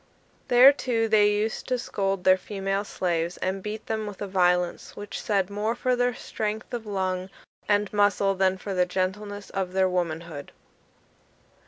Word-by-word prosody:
There, 250 +3 +8
too, 235 -5 0
they 210 -1 +5
used 210 +2 -2
to 255 - +1
scold 195 -5 -2
their 185 - +6
female 195 +1 -3
slaves, 175 -3 -2
and 190 +1 -2
beat 210 +2 -6
them, 220 -1 -2
with 205 -2 -8
a 205 - -3
violence 180 -2 +1
which 205 0 -6
said 200 -2 0
more 210 +3 -1
for 250 +1 +1
their 245 -1 +1
strength 215 +3 -4
of 230 -2 -4
lung 185 -2 -2 0.4
and 205 0 +2
muscle 205 -1 +3
than 190 0 +1
for 195 +1 -5
the 180 -1 +2
gentleness 200 +3 -3
of 190 -2 -3
their 190 0 +3
womanhood. 170 -4 -3
200 Hz, 165 wpm, -26 LUFS, 185-215 Hz, 0.4 s, There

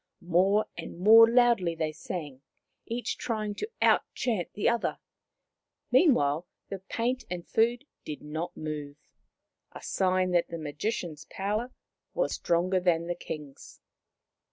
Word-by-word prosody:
More 195 +5 +4
and 170 0 -8
more 225 +5 +8
loudly 235 -8 +3
they 155 -1 -1
sang, 150 -5 -6 0.5
each 235 +1 -3
trying 215 -3 -2
to 425 - -5
out - - +5
chant 220 -9 -1
the 205 - 0
other. 235 0 +1 0.9
Meanwhile, 170 - +3 0.2
the 195 - -5
paint 235 +6 -2
and 175 -1 -5
food 235 +4 +1 0.2
did 150 - -7
not 160 +4 -5
move, 150 -2 -5 0.8
a - - -10
sign 185 -1 +1
that 175 -1 +2
the 170 - -6
Magician's 160 +1 -4
power 210 +6 -2 0.4
was - - 0
stronger 180 +2 +1
than 170 -2 +1
the 175 - -1
King's. 150 -5 -9
185 Hz, 130 wpm, -28 LUFS, 160-225 Hz, 0.9 s, more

